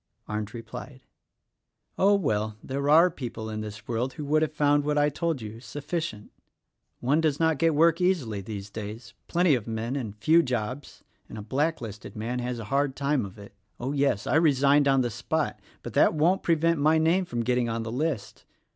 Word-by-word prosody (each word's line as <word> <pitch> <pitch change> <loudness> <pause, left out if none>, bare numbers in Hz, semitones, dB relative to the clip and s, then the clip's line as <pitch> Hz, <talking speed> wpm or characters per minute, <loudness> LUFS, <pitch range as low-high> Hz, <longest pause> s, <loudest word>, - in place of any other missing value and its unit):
Arndt 105 +1 -4
replied, 130 +3 -9 0.9
"Oh, 200 +2 +4
well, 110 - -1
there 140 +2 -2
are 165 +4 +6
people 115 -7 -6
in 110 0 -4
this 105 +1 -8
world 120 +3 -1
who 150 - -6
would 155 +2 +2
have 155 - +1
found 145 -1 +2
what 150 0 0
I 145 - +4
have 150 -1 +1
told 165 -6 -2
you, 110 +1 -8
sufficient. 145 -3 -5 0.7
One 145 +6 +2
does 150 -3 +1
not 160 -3 +2
get 165 -2 +3
work 165 +2 +4
easily 140 - 0
these 100 0 -7
days— 110 +3 -7
plenty 175 -2 +3
of 120 -5 -1
men 115 +3 -3
and 115 -7 -4
few 160 +10 +5
jobs 125 0 -4
— - - -41
and - - -8
a 105 - -6
black 145 +8 0
listed 105 -3 -8
man 115 +3 -3
has 125 0 -3
a 115 - -6
hard 140 -1 +1
time 140 -6 0
of 95 - -14
it. 100 -1 -12 0.3
Oh, 130 +3 -2
yes! 140 -7 +1
I - - +2
resigned 145 -2 +4
on 135 -1 +4
the 120 -1 -1
spot 145 +7 -2
— - - -31
but - - -7
that - - +4
won't 170 +5 +3
prevent 165 -1 +2
my 155 +2 +4
name 165 +4 +2
getting 120 -3 0
on 115 0 -2
the 115 - -5
list. 135 -2 -3
135 Hz, 205 wpm, -27 LUFS, 115-155 Hz, 0.9 s, are